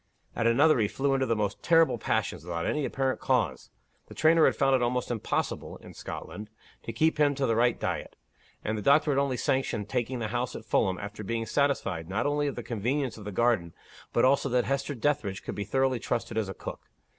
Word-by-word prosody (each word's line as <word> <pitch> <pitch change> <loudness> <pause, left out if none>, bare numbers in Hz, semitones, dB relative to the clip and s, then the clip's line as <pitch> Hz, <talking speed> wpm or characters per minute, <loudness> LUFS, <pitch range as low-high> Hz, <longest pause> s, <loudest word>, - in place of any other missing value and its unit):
At 115 - +1
another, 140 +4 +4
he 105 - +3
flew 135 +5 0
into 135 -1 +1
the 115 - +1
most 100 -2 -2
terrible 165 -7 +4
passions 100 -7 -1
without 85 -1 -3
any 150 -2 0
apparent 135 -1 -1
cause. 115 - 0 0.4
The - - -12
trainer 160 +1 +5
had - - +3
found 135 0 +3
it 130 - +1
almost 125 0 0
impossible 115 -3 -2
(in - - -13
Scotland) 105 0 -7 0.3
to - - -6
keep 155 +7 +1
him 145 -1 +4
to 135 0 0
the 115 - +1
right 120 +1 +2
diet; - - -3 0.5
and 110 - -1
the 105 - -3
doctor 145 +6 +4
had 140 - +2
only 140 -3 0
sanctioned 115 -5 -1
taking 125 0 -1
the 110 -3 -3
house 120 +2 -2
at 110 - -8
Fulham, 95 -5 +1
after 105 +1 -7
being 115 +3 -2
first - - -9
satisfied, 95 - 0
not 100 +5 -1
only 145 0 +1
of 140 - -3
the - - -5
convenience 125 +3 -2
of 105 - -10
the 105 - -4
garden, 100 -6 +1 0.4
but 120 - +3
also 140 +1 +3
that 125 -1 +2
Hester 140 +1 -1
Dethridge 115 -7 -1
could - - -5
be 100 - -4
thoroughly 130 -2 +1
trusted 115 -1 -3
as 110 -3 -1
a 95 - -6
cook. - - -8
120 Hz, 225 wpm, -28 LUFS, 110-140 Hz, 0.5 s, trainer